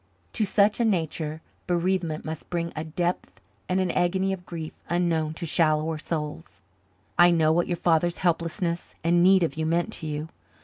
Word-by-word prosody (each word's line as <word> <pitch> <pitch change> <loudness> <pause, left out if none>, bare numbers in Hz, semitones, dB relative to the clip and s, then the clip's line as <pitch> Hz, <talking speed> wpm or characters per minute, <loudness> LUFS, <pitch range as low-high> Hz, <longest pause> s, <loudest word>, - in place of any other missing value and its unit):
To 220 - +1
such 205 +2 +3
a - - +3
nature 160 -6 -1 0.2
bereavement 175 -2 0
must 160 0 -6
bring 170 -1 -2
a 155 - -3
depth 175 +3 -3 0.3
and 185 +1 +2
an 185 -2 +1
agony 190 +2 +1
of 180 -2 -8
grief 160 -2 -6 0.2
unknown 165 -3 0
to 170 - -5
shallower 155 -1 +1
souls. 150 - -5 0.6
I 175 0 +8
know 160 -2 +3
what 175 +1 +1
your 175 - -1
father's 170 +1 +2
helplessness 170 0 -1
and 170 +1 +3
need 185 0 +6
of 155 -2 -1
you 160 0 -1
meant 170 +1 0
to 160 - -5
you. 150 +1 -4
170 Hz, 175 wpm, -26 LUFS, 160-180 Hz, 0.6 s, I